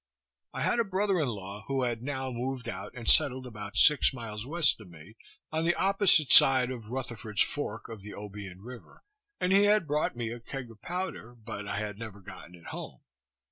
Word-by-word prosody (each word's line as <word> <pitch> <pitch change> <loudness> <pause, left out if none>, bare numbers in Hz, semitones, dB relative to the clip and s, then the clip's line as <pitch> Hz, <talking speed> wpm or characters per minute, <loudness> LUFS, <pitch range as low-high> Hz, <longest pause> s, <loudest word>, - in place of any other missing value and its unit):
I - - -3
had 240 - +2
a - - +4
brother 195 -2 0
in 150 - +1
law 100 -2 -6
who 135 -1 0
had 120 -2 -2
now 130 0 -3
moved 125 +1 -4
out 100 +1 -6
and 120 -2 -8
settled 130 -1 +5
about 105 -4 -8
six 150 -2 +6
miles 115 -2 -6
west 160 -6 +2
of 100 - -13
me, 85 +6 -14 0.4
on 160 +1 -1
the 175 +1 +2
opposite 195 -6 +3
side 130 -1 +7
of 115 -4 -8
Rutherford's 115 -4 -1
fork 115 -6 -5
of 110 -3 -9
the 105 +1 -9
Obion 100 -2 -8
river, 125 +2 -12 0.4
and 180 +1 +1
he 200 +1 +6
had 210 -2 +4
brought 150 -2 0
me 115 -2 -3
a 120 - -6
keg 125 0 -7
of 110 -1 -17
powder, 175 -8 -5
but 110 -3 -8
I 100 - -3
had 105 -1 -4
never 110 -3 -8
gotten 90 -2 -12
it 85 - -17
home. - - -8
120 Hz, 205 wpm, -29 LUFS, 105-145 Hz, 0.4 s, side